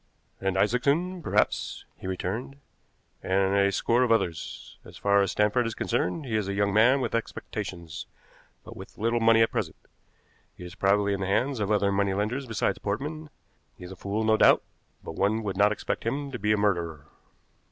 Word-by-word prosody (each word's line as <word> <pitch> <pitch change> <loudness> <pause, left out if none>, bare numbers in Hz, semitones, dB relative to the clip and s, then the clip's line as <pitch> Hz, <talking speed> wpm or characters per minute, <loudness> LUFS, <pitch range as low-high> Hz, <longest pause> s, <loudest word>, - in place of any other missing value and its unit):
"And 95 -1 -1
Isaacson, 140 - +1
perhaps," - - 0
he - - -9
returned, 95 +8 -4 0.7
"and 95 +1 +1
a 100 0 +3
score 115 +5 +1
of 125 -2 +2
others. 85 -8 -2
As - - -13
far 100 0 +3
as 100 - +1
Stanford 105 +4 +2
is 115 - -5
concerned, 140 - -1
he 115 -4 -3
is 105 -3 0
a 100 - -2
young 100 0 +1
man 125 +6 +5
with - - -2
expectations, 95 -7 -5 0.6
but - - -11
with - - -11
little 115 +2 +1
money 115 0 +5
at 115 - 0
present. - - -2 0.8
He - - -10
is 90 - -9
probably 100 +1 +2
in 100 - -2
the 95 - -1
hands 125 +6 0
of 105 -1 -1
other 100 -2 +2
money 100 -1 +1
lenders 120 +7 -2
besides 115 -2 -1
Portman; 150 +9 -4 0.5
he - - -12
is 90 - -9
a - - -8
fool 100 +4 -3
no 110 0 +3
doubt, - - +5 0.4
but - - -6
one 105 +6 0
would 100 -2 -3
not 105 +2 +4
expect 105 - -3
him 140 +4 -3
to 125 - -5
be 105 +1 +1
a 105 - +3
murderer." 85 -7 -1
105 Hz, 195 wpm, -27 LUFS, 100-115 Hz, 0.8 s, man